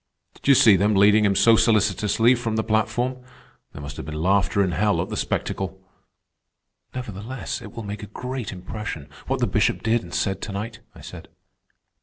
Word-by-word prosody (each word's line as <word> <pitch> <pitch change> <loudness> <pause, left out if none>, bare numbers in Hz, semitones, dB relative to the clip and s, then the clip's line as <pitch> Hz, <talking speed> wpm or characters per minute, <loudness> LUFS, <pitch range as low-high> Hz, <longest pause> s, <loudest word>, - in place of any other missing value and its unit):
Did - - -12
you 140 - +7
see 110 -5 +6
them 105 +3 +2
leading 105 +2 +5
him 100 -1 +2
so 115 +2 +6
solicitously 110 +2 +3
from 115 -3 -2
the 110 - 0
platform? 120 +4 -1 0.5
There 70 - -10
must 70 0 -8
have - - -6
been 80 - -5
laughter 100 +3 +2
in 95 - -1
hell 90 +1 +1
at 90 +4 -2
the 110 - -4
spectacle." 95 -2 -3 1.2
"Nevertheless, 120 +1 -5
it 105 - -10
will 115 - -7
make 100 0 -6
a 105 - -7
great 125 +1 -5
impression, 90 -5 -7 0.2
what - - -1
the - - +4
Bishop - - 0
did 115 +1 +2
and 85 - -12
said 95 +1 -1
to 110 - -5
night," 110 +3 -5 0.2
I - - -13
said. - - -10
105 Hz, 190 wpm, -23 LUFS, 95-115 Hz, 1.2 s, you